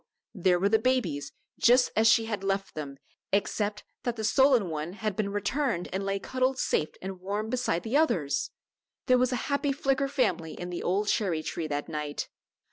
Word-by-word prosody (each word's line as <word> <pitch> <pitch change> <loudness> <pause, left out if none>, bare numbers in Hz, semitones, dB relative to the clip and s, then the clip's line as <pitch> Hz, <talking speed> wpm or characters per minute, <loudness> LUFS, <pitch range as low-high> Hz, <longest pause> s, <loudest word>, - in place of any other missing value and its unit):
there 185 -3 +3
were 190 +3 +2
the 220 +2 +4
babies 215 - 0 0.3
just 250 +1 +5
as 220 +1 +4
she 225 0 +5
had 210 -3 -3
left 195 0 -1
them 140 -3 -6 0.3
except 205 +1 0 0.2
that 240 -2 -2
the 220 - -5
stolen 250 -1 +4
one 160 +1 -4
had 215 -1 -3
been 200 0 -1
returned 205 -1 -1
and 190 +1 -1
lay 195 0 0
cuddled 255 +5 0
safe 155 - 0
and 190 -1 -6
warm 205 +3 -3
beside 250 -9 0
the 225 +4 -2
others! 175 - +2 0.6
There 255 0 +4
was 255 0 +2
a - - +1 0.2
happy 280 0 +1
Flicker 275 -1 +1
family 255 - 0
in 175 0 -5
the 175 - -4
old 200 +4 0
cherry 175 -8 +1
tree 160 +1 -3
that 145 -1 -3
night. 150 -1 -4
205 Hz, 190 wpm, -28 LUFS, 175-250 Hz, 0.6 s, just